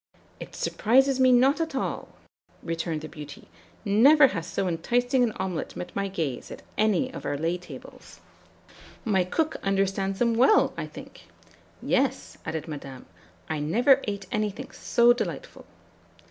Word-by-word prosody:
"'It - - -9
surprises 265 +4 +2
me 255 -1 +5
not 265 +6 +4
at 320 -4 -3
all,' - - -3 0.5
returned 165 -1 -3
the 155 - -7
beauty; 150 -3 -11 0.4
'never 270 +9 +6
has 165 -3 -5
so 195 - -2
enticing 245 +10 +1
an 240 -2 +2
omelet 190 -4 -4
met 180 - -7
my 200 0 -1
gaze 160 -10 -4
at - - -10
any 220 +5 +1
of - - -8
our 145 - -2
lay 165 +4 -1
tables.' 180 0 -12 0.9
"'My 195 -4 +2
cook 315 - -1
understands 195 0 0
them 235 +1 +2
well, 255 - +4
I - - -5
think.' - - -12 0.6
"'Yes,' - - 0
added 160 0 -4
Madame, 140 -4 -8 0.4
'I 160 -1 -2
never 245 - +3
ate 200 -1 -4
anything 210 -2 -3
so 240 0 +3
delightful.'" 245 - -6
200 Hz, 145 wpm, -26 LUFS, 165-245 Hz, 0.9 s, never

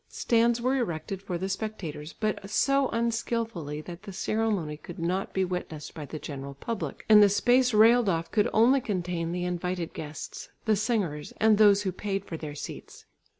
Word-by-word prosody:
Stands 235 0 +2
were 255 +3 +1
erected 190 -4 -3
for 185 -3 -3
the 190 +2 -3
spectators, 190 -7 -5
but 215 -2 -3
so 275 +4 +3
unskilfully 230 -10 -2
that 175 +2 -9
the 200 - -9
ceremony 195 -5 -1
could 165 +3 -10
not 180 +3 -1
be 190 -1 +1
witnessed 175 -4 -5
by 150 -3 -7
the 155 - -6
general 140 -2 -7
public, 225 - -5
and 215 -1 +8
the 205 - +7
space 245 +5 +3
railed 225 +1 +6
off 165 -2 -1
could 210 - +2
only 250 +5 +5
contain 175 -5 -2
the 180 0 -2
invited 180 -1 -3
guests, 150 -1 -7 0.2
the 220 -1 +3
singers 200 -9 -1
and 215 -1 +4
those 205 -1 +6
who 190 - -1
paid 195 +1 -3
for 165 - -6
their 155 -2 -6
seats. - - -9
195 Hz, 180 wpm, -28 LUFS, 165-220 Hz, 0.2 s, and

